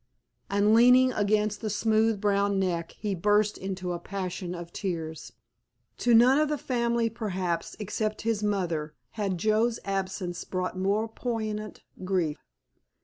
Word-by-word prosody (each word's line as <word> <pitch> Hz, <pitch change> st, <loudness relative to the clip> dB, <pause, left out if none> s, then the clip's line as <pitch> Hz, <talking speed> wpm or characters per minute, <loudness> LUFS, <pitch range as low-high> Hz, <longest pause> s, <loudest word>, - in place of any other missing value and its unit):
And 205 Hz, +2 st, +3 dB
leaning 250 Hz, +2 st, +6 dB
against 210 Hz, 0 st, +1 dB
the 220 Hz, -, -2 dB
smooth 220 Hz, +1 st, +2 dB
brown 200 Hz, -1 st, +1 dB
neck 175 Hz, -3 st, -1 dB
he 205 Hz, -2 st, -2 dB
burst 205 Hz, +3 st, +2 dB
into 185 Hz, -2 st, -4 dB
a 175 Hz, -, -4 dB
passion 185 Hz, -1 st, -4 dB
of 170 Hz, 0 st, -8 dB
tears. 165 Hz, -5 st, -4 dB, 0.7 s
To 240 Hz, -1 st, +4 dB
none 250 Hz, +5 st, +6 dB
of 305 Hz, -1 st, +2 dB
the 300 Hz, -, 0 dB
family 235 Hz, -3 st, 0 dB
perhaps, 190 Hz, -7 st, -3 dB
except 215 Hz, +1 st, -3 dB
his 225 Hz, -2 st, 0 dB
mother, 175 Hz, -7 st, -1 dB, 0.2 s
had 200 Hz, -4 st, -2 dB
Joe's 220 Hz, +5 st, +1 dB
absence 190 Hz, -2 st, -3 dB
brought 185 Hz, 0 st, -3 dB
more 200 Hz, +4 st, 0 dB
poignant 215 Hz, -3 st, -4 dB, 0.2 s
grief. 180 Hz, -5 st, 0 dB
205 Hz, 140 wpm, -28 LUFS, 185-220 Hz, 0.7 s, leaning